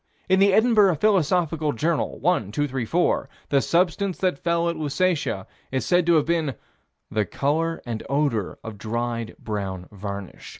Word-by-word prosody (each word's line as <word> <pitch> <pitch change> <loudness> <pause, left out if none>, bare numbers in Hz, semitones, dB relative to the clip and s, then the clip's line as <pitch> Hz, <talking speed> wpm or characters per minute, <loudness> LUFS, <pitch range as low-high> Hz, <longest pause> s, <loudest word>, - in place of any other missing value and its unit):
In 190 0 +4
the 200 0 +5
Edinburgh 215 -3 +5
Philosophical 165 -4 +2
Journal, 160 +6 -1
1 155 - +1
234, 145 +4 0 0.2
the 140 -1 +3
substance 180 +3 +1
that 180 -7 0
fell 170 0 +1
at 170 - 0
Lusatia 155 - 0 0.3
is 130 -4 -1
said 175 -1 +2
to 170 - +5
have 150 -2 +3
been 165 -2 +1
of 130 - -5 0.6
the 105 -1 +1
"color 165 +4 -1
and 115 -2 -4
odor 140 -8 0
of 110 -3 -8
dried, 115 +1 -3
brown 95 -4 -4
varnish." 100 -1 -7
150 Hz, 155 wpm, -24 LUFS, 115-175 Hz, 0.6 s, the